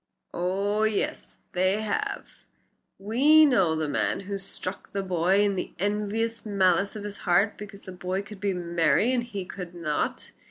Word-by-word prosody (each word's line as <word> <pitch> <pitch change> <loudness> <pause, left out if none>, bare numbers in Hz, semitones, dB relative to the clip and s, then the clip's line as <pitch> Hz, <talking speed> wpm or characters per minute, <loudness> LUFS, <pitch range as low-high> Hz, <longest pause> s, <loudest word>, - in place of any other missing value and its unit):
"Oh! 195 +4 0
yes, 220 -2 -1
they 185 +3 +1
have. 210 - -4 0.5
We 275 +10 +5
know 195 - +3
the 155 -1 -1
man 145 - 0
who 200 0 -4
struck 190 -1 -6
the 200 -1 -1
boy 185 +2 +2
in 205 -1 +2
the 185 - -4
envious 210 +3 -1
malice 195 -2 +2
of 210 - -6
his 205 -1 -6
heart 185 +4 +2
because 200 -1 -10
the 185 - -8
boy 185 +2 -3
could 210 -1 -11
be 200 0 0
merry 170 - +2
and 250 - +2
he 205 -6 -5
could 180 -2 -8
not." 155 -4 -2
195 Hz, 165 wpm, -27 LUFS, 180-210 Hz, 0.5 s, We